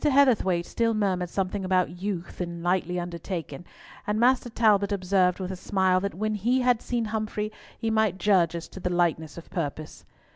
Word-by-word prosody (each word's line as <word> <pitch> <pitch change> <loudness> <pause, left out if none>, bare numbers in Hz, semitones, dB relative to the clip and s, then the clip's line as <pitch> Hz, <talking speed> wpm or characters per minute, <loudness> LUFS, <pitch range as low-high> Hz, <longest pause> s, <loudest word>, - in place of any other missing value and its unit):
Heatherthwayte 250 - +3
still 230 -1 0
murmured 185 -4 0
something 195 +2 -2
about 185 -1 0
"youth" 190 -3 -4
and 170 -1 -5
"lightly 180 0 0
undertaken," 175 -2 -5 0.4
and 210 +1 0
Master 250 +1 +3
Talbot 210 -3 +3
observed, 185 -2 +2
with 185 0 -3
a - - -4
smile, 185 0 +1
that 200 -1 -3
when 215 +3 -1
he 240 +6 +1
had 245 -2 +3
seen 240 -2 -1
Humfrey 215 -1 -3 0.3
he 225 - -1
might 220 -4 +2
judge 180 -4 +3
as 170 - -5
to - - -10
the 180 - -2
lightness 170 -3 0
of 170 - -11
purpose. 155 -2 -4
190 Hz, 180 wpm, -26 LUFS, 175-215 Hz, 0.4 s, Heatherthwayte